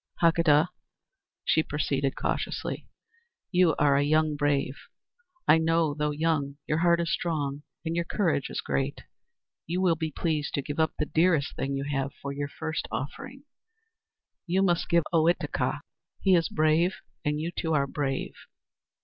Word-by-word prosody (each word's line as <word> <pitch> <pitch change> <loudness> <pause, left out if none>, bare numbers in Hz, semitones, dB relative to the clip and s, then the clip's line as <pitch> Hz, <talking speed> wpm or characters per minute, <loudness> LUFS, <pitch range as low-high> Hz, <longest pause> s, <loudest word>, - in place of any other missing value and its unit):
"Hakadah," 165 -1 +4 0.8
she 160 - +4
proceeded 140 -3 -1
cautiously, - - -3 0.6
"you 180 -4 +4
are 145 -1 +3
a - - +3
young 155 +1 +2
brave. 145 -2 0 0.7
I 160 - +7
know, 165 -1 +2
though 150 0 -1
young, 150 -2 0
your 150 - 0
heart 170 0 +4
is 170 0 0
strong 150 -5 -2 0.2
and 165 +1 -1
your 170 0 0
courage 170 -8 0
is - - -3
great. 70 -1 -2 0.6
You 175 +3 -1
will 185 -2 +4
be 160 -1 -2
pleased 155 -1 -1
to 140 - -1
give 145 +3 -5
up 160 0 +2
the 150 - 0
dearest 160 -1 +2
thing 135 +1 -2
you 135 - -2
have 140 -1 -2
for 140 0 -5
your 145 0 -3
first 155 +2 -4
offering. 260 - -6 1.0
You 185 +3 +2
must 175 -3 +1
give 170 -1 +5
up 160 - -11
Ohitika. 165 +1 +1 0.4
He 190 - +3
is 165 -2 +3
brave; 155 +4 +2 0.3
and 150 0 0
you, 165 +2 -2
too, 160 -2 0
are 140 -1 +3
brave. 135 -1 -2
155 Hz, 160 wpm, -28 LUFS, 145-170 Hz, 1.0 s, I